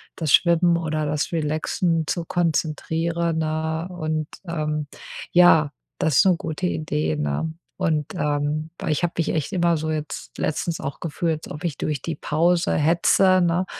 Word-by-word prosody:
das 160 -4 -1
Schwimmen 170 +1 +5
oder 155 -2 -2
das 150 0 -1
Relaxen 160 +1 0
zu 170 - -1
konzentrieren, 165 0 0
ne, 160 +1 -1
und, 155 -3 -2 0.2
ähm, 150 -2 -2 0.4
ja, 160 -4 +6 0.3
das 150 -4 +1
ist - - +6
'ne 185 -2 +5
gute 160 +3 -3
Idee, 80 - -1
ne? 75 - -1 0.2
Und, 160 -5 0
ähm, 150 +1 -1
weil - - -2
ich 155 - -1
habe 175 - +1
mich 165 - 0
echt 155 -3 -1
immer 170 -2 +2
so, 155 0 -3
jetzt 155 -1 -5
letztens 160 +2 -1
auch, 140 - -5
gefühlt, 160 -1 -2
als - - -7
ob 150 +4 -8
ich 160 -5 -2
durch 150 -3 -2
die 165 - -3
Pause 170 +4 +1
hetze, 180 +4 +4
ne? 175 +1 +2
160 Hz, 165 wpm, -23 LUFS, 150-170 Hz, 0.4 s, ja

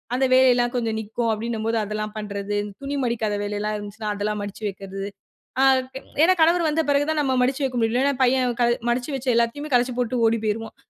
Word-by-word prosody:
அந்த 265 +1 +2
வேலையில்லாம் 250 -1 +4
கொஞ்சம் 225 -3 -1
நிக்கும். 225 +2 -2
அப்பிடின்னும்போது 225 0 -2
அதெல்லாம் 215 0 -4
பண்றது. 205 -1 -3 0.2
துணி 280 +1 -3
மடிக்காத 225 -3 -1
வேலையிலாம் 210 +1 -2
இருந்துச்சுனா 210 +1 -6
அதெல்லாம் 210 +1 -2
மடிச்சு 205 +2 -8
வைக்கிறது. 195 0 -7 0.6
அ - - +6 0.3
ஏ - - -12 0.2
ஏன்னா 370 +2 +5
கணவர் 335 0 +4
வந்த 320 +2 +1
பிறகு 285 0 +2
தான் 310 -1 +1
நாம் 260 -2 +1
மடிச்சு 265 +3 -1
வைக்க 255 -2 -2
முடியும். 225 0 +1
இல்லன்னா 280 +2 +2
பையன் 250 -1 +2
கல 240 - +4 0.2
மடிச்சு 245 +4 -1
வச்ச 265 0 -6
எல்லாத்தையுமே 255 +6 0
கலச்சி 245 0 +2
போட்டு 245 0 0
ஓடி 230 +1 +2
போயிருவான். 220 +1 -3
235 Hz, 195 wpm, -23 LUFS, 215-260 Hz, 0.6 s, அ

